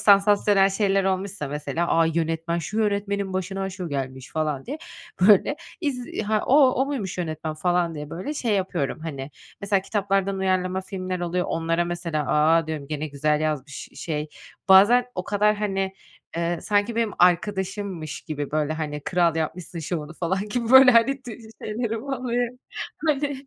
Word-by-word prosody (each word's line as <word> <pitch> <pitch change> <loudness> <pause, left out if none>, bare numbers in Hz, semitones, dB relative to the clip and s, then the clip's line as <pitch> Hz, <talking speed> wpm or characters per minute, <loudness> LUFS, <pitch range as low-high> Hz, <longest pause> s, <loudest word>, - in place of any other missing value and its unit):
sansasyonel 200 -1 +5
şeyler 195 -1 +1
olmuşsa, 190 -4 -2
mesela, 150 +4 -2
A! 165 - +5
Yönetmen, 165 +1 -1
şu 210 +6 -4
yönetmenin 200 -2 0
başına 190 +1 -3
şu 185 -2 -6
gelmiş." 130 -2 -5
falan 155 -4 -2
diye, 290 +5 -5 0.4
böyle, 210 +9 +5 0.2
iz 265 -7 -2 0.2
"Ha, 215 0 +1
o 275 0 +6
o 265 +2 +1
muymuş 230 -11 -4
yönetmen?" 155 -2 -3
falan 175 +1 0
diye, 150 -1 -7
böyle, 235 - -4
şey 235 -6 -1
yapıyorum, 180 -7 -1
hani. 140 -4 -6 0.3
Mesela, 200 -1 +1
kitaplardan 195 -1 0
uyarlama 185 -1 0
filmler 185 -1 -5
oluyor. 175 +1 -1
Onlara 165 +1 0
mesela, 170 -3 -2
"A!" 160 +2 +3
diyorum, 155 -3 -4
"Gene 155 0 -3
güzel 150 +1 0
yazmış, 150 -2 -3
şey." 155 -2 -4 0.4
Bazen 210 +6 +7
o 180 - -3
kadar, 210 +2 +2
hani, 195 -2 -1 0.4
eee, 170 0 -1
sanki 205 +3 +1
benim 230 -3 +1
arkadaşımmış 190 -2 0
gibi, 145 -2 -5
böyle, 155 0 0
hani, 150 -2 -4
kral 170 +1 +1
yapmışsın 165 +2 -4
şovunu, 155 -1 -4
falan 190 +5 -2
gibi, 235 +1 -2
böyle, 265 0 +9
hani, 250 +3 +3
ti 245 -3 -7
şi 220 0 -12 0.2
şeylerim 225 0 -2
oluyor, 250 -2 -2 0.5
hani 285 -2 -1
185 Hz, 160 wpm, -24 LUFS, 160-210 Hz, 0.5 s, böyle